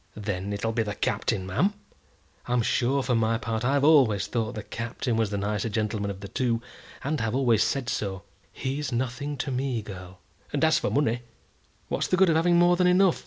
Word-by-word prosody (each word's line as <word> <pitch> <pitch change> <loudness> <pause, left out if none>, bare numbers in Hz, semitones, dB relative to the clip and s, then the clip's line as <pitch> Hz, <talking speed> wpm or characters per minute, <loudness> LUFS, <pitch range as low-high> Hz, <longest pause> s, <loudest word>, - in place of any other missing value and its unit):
"Then 100 -2 -3
it'll 100 +2 -1
be 115 - 0
the 105 -2 -3
Captain, 95 - -1
ma'am? 185 - +1 0.7
I'm 120 -1 +1
sure, 130 +5 +1
for 125 - 0
my 115 0 +2
part, 115 -1 -3
I've 140 +2 +2
always 130 -10 +5
thought 115 -1 -2
the 105 - -5
Captain 120 +1 -3
was 110 -2 +1
the 100 - -2
nicer 105 +2 -1
gentleman 105 -1 -1
of 100 -1 -6
the 100 - -6
two, 115 +3 0 0.4
and 145 +2 -1
have 115 0 -1
always 120 -5 +3
said 135 +1 0
so." 100 -7 -3 0.3
"He's 135 +2 -3
nothing 130 +4 -2
to 135 +2 -3
me, 130 -3 -1
girl." 95 -2 -9 0.3
"And 145 0 -1
as 160 0 +4
for - - -1
money, 120 -4 +1 0.7
what's - - -1
the 185 - +1
good 190 -2 +5
of - - +2
having 170 +2 +4
more 175 0 +5
than 180 0 +3
enough? 180 0 +4
120 Hz, 205 wpm, -26 LUFS, 105-140 Hz, 0.7 s, always